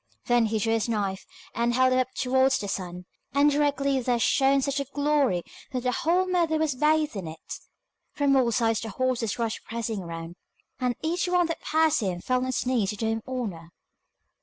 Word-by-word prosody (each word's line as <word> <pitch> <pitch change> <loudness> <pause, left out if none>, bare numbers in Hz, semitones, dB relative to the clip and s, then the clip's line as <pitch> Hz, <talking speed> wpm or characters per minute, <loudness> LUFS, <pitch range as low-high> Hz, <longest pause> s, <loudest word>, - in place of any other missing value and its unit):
Then 240 -2 +3
he 220 +1 -1
drew 225 +1 +1
his 225 0 0
knife, 200 -3 -2 0.3
and 235 +1 0
held 255 0 +4
it 255 - +3
up 255 0 0
towards 265 +1 +2
the 205 - -5
sun, 180 -2 -5 0.3
and 290 +1 +5
directly 280 -2 +1
there 245 -1 +1
shone 270 +3 +3
such 280 0 0
a 280 - -2
glory 285 -9 +1 0.3
that 255 - -1
the 250 - +1
whole 345 +8 +1
meadow 345 -4 +1
was 310 -2 +1
bathed 305 +1 +2
in 190 -4 -5
it. 160 0 -8 0.5
From 280 -1 +2
all 250 -3 +3
sides 225 -1 +1
the 225 - -5
horses 240 -1 -1
rushed 230 -2 -2
pressing 225 -2 -4
round, 170 -1 -7 0.4
and 250 -2 0
each 345 +3 0
one 360 -1 +3
that 330 0 -4
passed 315 0 +2
him 185 -6 -2
fell 255 +7 0
on 255 - -2
its 260 -1 -1
knees 240 -6 +1
to 210 - -3
do 225 - -3
him 225 0 -1
honour. 205 -11 -4
255 Hz, 205 wpm, -26 LUFS, 220-280 Hz, 0.5 s, and